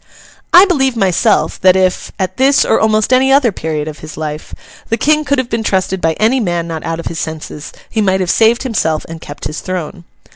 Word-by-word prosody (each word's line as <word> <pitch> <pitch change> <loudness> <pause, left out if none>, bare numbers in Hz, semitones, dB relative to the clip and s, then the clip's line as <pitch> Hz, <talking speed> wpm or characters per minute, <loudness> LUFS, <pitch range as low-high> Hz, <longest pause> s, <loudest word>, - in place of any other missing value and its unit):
I 360 +3 +8
believe 270 -9 +1
myself, 195 +1 +1
that 185 0 +5
if, 185 -1 0
at 185 -2 -3
this 270 +2 +3
or - - +2
almost 215 +2 +2
any 265 +1 +3
other 270 -4 +4
period 155 -4 -4
of 155 -1 -7
his 155 0 -10
life, 155 -1 -6 0.3
the 230 - 0
King 305 +3 +2
could 285 -1 0
have 260 -2 -1
been 225 0 -1
trusted 190 -3 -1
by 160 0 +1
any 225 +9 +1
man 175 -6 -2
not 160 -2 -5
out 165 0 -3
of 170 - -7
his 165 - -4
senses, 155 -2 -6 0.2
he 220 - -2
might 190 -2 +1
have 185 -2 0
saved 230 +1 +3
himself 165 - -1
and 165 0 -9
kept 145 - -9
his 150 +2 -4
throne. 180 -1 -5
190 Hz, 220 wpm, -14 LUFS, 165-235 Hz, 0.3 s, I